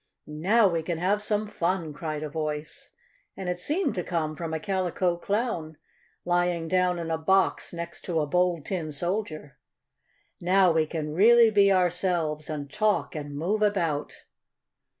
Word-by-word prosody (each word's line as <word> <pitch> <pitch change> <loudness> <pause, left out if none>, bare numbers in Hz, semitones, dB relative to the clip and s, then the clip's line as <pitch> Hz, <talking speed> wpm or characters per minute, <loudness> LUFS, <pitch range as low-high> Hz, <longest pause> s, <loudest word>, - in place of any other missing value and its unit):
"Now 195 +9 +3
we 170 -3 0
can 165 +1 -3
have 195 +5 +1
some 210 0 0
fun!" 175 -5 -2
cried 155 0 -4
a - - -2
voice, 150 0 -5 0.5
and 190 - -5
it 180 0 -2
seemed 315 - 0
to 180 - -3
come 160 -3 -2
from 165 0 -5
a 160 - -2
Calico 185 0 0
Clown, 175 -5 -2 0.5
lying 175 -1 +1
down 180 0 +2
in 165 -1 -4
a 160 - -1
box 190 +4 +2
next 170 0 -7
to 170 -3 0
a 150 - +1
Bold 175 0 +1
Tin 170 -5 -3
Soldier. 155 -3 -4 0.8
"Now 185 +1 +4
we 160 -1 +2
can 150 -2 -4
really 230 +5 +6
be 200 -1 +5
ourselves, 175 -4 0
and 145 -2 -5
talk 210 -8 +1
and 145 -1 -6
move 195 +8 -1
about." 170 -8 -1
175 Hz, 160 wpm, -26 LUFS, 155-190 Hz, 0.8 s, really